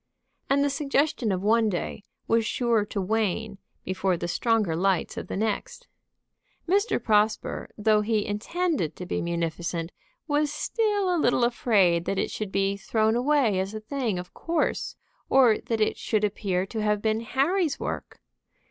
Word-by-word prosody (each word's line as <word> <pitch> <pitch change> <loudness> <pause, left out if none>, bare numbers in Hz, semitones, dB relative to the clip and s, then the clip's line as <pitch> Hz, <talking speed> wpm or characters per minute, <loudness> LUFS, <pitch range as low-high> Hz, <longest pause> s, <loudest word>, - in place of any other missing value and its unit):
And 280 +1 +3
the 285 - +2
suggestion 275 -4 0
of 185 0 -2
one 220 +1 +3
day 195 +2 -4 0.2
was 230 0 +3
sure 230 -1 +1
to 205 - -4
wane 210 +1 -1 0.3
before 185 -1 0
the 175 - -3
stronger 215 -2 +1
lights 185 +1 0
of - - -6
the - - -4
next. 215 0 -2 0.8
Mr. 400 +5 +2
Prosper, 215 0 +1
though 210 0 +3
he 215 -1 0
intended 215 - -1
to 180 - -7
be - - -2
munificent, 170 0 -2 0.4
was 295 -1 +1
still 405 +2 0
a 330 - +1
little 245 -1 +3
afraid 200 -8 +3
that 195 - -1
it - - -1
should 210 -3 -4
be 195 0 0
thrown 220 +3 +1
away 250 -6 +2
as 195 +3 -3
a - - -3
thing 225 -3 -2
of 180 0 -7
course, 330 -2 -1 0.3
or 250 -5 +5
that 225 -1 -3
it 215 - +1
should 215 -2 -1
appear 190 -3 0
to 220 +3 -4
have 210 -1 +1
been 220 0 +1
Harry's 285 - 0
work. - - -5
215 Hz, 165 wpm, -26 LUFS, 195-260 Hz, 0.8 s, or